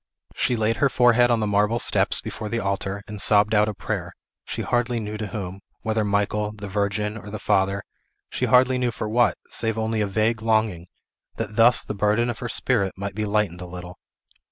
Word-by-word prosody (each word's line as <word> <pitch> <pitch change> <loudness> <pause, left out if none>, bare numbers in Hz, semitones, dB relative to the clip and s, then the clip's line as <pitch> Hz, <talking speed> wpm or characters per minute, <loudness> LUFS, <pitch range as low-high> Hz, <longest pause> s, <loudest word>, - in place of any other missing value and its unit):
She 125 - 0
laid 110 0 0
her 140 - +3
forehead 120 -1 +4
on 115 -2 +2
the - - +1
marble 105 +2 +2
steps - - +2
before 105 - -6
the 115 - -1
altar, 100 0 -3
and 105 -2 -3
sobbed 105 0 +4
out 105 0 +4
a 105 - -5
prayer; - - -4 0.3
she - - -4
hardly 120 -1 0
knew 105 -1 -5
to 105 0 -4
whom, 95 -1 -6 0.2
whether 110 0 0
Michael, 105 +1 0
the 105 -1 -8
Virgin, 105 +1 -1
or 105 - -10
the 110 - -5
Father; 95 -1 +1 0.5
she - - -1
hardly 130 0 +4
knew 125 -1 +1
for 110 - -4
what, 120 +2 +2
save 115 -1 -1
only 110 0 -1
a 105 - +1
vague 110 +2 0
longing, 110 -6 0 0.5
that 105 -2 -5
thus 115 +2 +5
the - - -5
burden 105 +4 +1
of 115 - -9
her 120 - -4
spirit 110 -6 0
might 100 0 -4
be 105 +2 -2
lightened 100 -4 0
a 90 - -7
little. 90 0 -9
105 Hz, 205 wpm, -24 LUFS, 100-115 Hz, 0.5 s, thus